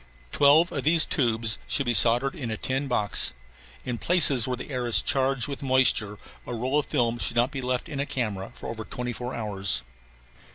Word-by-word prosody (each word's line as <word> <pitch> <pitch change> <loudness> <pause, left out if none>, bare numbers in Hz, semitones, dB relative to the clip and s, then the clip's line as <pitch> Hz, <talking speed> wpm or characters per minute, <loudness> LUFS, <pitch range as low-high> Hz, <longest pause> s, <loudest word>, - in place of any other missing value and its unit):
Twelve 150 +5 +4
of - - -4
these 160 +1 +5
tubes 115 -4 0
should 140 - 0
be 120 - 0
soldered 120 +4 +3
in 130 -8 -6
a 110 - -4
tin 135 +5 -2
box. 105 - 0 0.5
In 120 -2 -4
places 145 -9 +3
where 125 -1 -2
the 130 - -8
air 125 -2 -3
is 120 - +4
charged 135 -2 0
with 140 -1 -6
moisture 130 -6 +2 0.3
a 120 - -4
roll 130 +5 0
of 150 - -4
films 120 -4 -1
should - - 0
not 120 +3 +2
be 135 -3 -5
left 125 0 -2
in 145 - -6
a 140 - -2
camera 105 -7 -4
over 110 -1 -6
twenty 125 +2 -5
four 125 +2 -6
hours. 100 - -1
125 Hz, 200 wpm, -25 LUFS, 115-135 Hz, 0.5 s, these